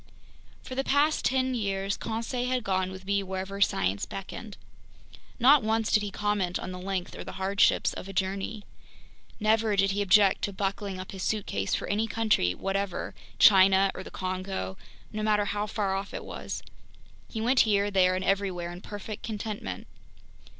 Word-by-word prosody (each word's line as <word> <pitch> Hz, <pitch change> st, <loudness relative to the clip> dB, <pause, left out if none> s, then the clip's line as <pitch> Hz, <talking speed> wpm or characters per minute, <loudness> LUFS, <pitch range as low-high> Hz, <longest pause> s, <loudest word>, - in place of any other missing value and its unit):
For -, -, -7 dB
the 270 Hz, +1 st, 0 dB
past 290 Hz, +3 st, +2 dB
ten 260 Hz, 0 st, +2 dB
years, 195 Hz, -3 st, -1 dB
Conseil 230 Hz, +2 st, -3 dB
had 255 Hz, -2 st, 0 dB
gone 190 Hz, -1 st, 0 dB
with 190 Hz, 0 st, -9 dB
me 200 Hz, 0 st, +1 dB
wherever 190 Hz, +1 st, -5 dB
science 95 Hz, -, +1 dB
beckoned. 200 Hz, +2 st, -7 dB, 0.8 s
Not 270 Hz, +3 st, +6 dB
once 220 Hz, 0 st, 0 dB
did 215 Hz, -, +4 dB
he 205 Hz, -, -3 dB
comment 200 Hz, -3 st, -1 dB
on -, -, -6 dB
the 180 Hz, -, -6 dB
length 185 Hz, -1 st, -3 dB
or -, -, -6 dB
the -, -, -8 dB
hardships 195 Hz, +1 st, +2 dB
of -, -, -7 dB
a -, -, -7 dB
journey. 195 Hz, +3 st, -2 dB, 0.8 s
Never 215 Hz, 0 st, +2 dB
did 195 Hz, 0 st, +3 dB
he 200 Hz, +1 st, -1 dB
object 200 Hz, 0 st, +5 dB
to 200 Hz, -, -5 dB
buckling 195 Hz, 0 st, -3 dB
up 185 Hz, -, -7 dB
his 190 Hz, -, -7 dB
suitcase 190 Hz, -, -1 dB
for -, -, -4 dB
any 215 Hz, +2 st, 0 dB
country 215 Hz, -, +1 dB
whatever, 195 Hz, -1 st, -2 dB, 0.2 s
China 195 Hz, -1 st, +6 dB
or -, -, -7 dB
the -, -, -9 dB
Congo, 185 Hz, -, -4 dB, 0.4 s
no 215 Hz, -, -3 dB
matter 210 Hz, -1 st, +2 dB
how 205 Hz, +1 st, -2 dB
far 200 Hz, -2 st, -1 dB
off 195 Hz, +1 st, -4 dB
it -, -, -5 dB
was. -, -, -6 dB, 0.7 s
He 225 Hz, -, -5 dB
went 250 Hz, +4 st, +2 dB
here, 205 Hz, -1 st, +3 dB
there, 185 Hz, -1 st, +4 dB
and 185 Hz, 0 st, -2 dB
everywhere 190 Hz, -3 st, 0 dB
in 175 Hz, +1 st, -9 dB
perfect 205 Hz, +1 st, -7 dB
contentment. 210 Hz, -, -5 dB
200 Hz, 175 wpm, -28 LUFS, 190-215 Hz, 0.8 s, Not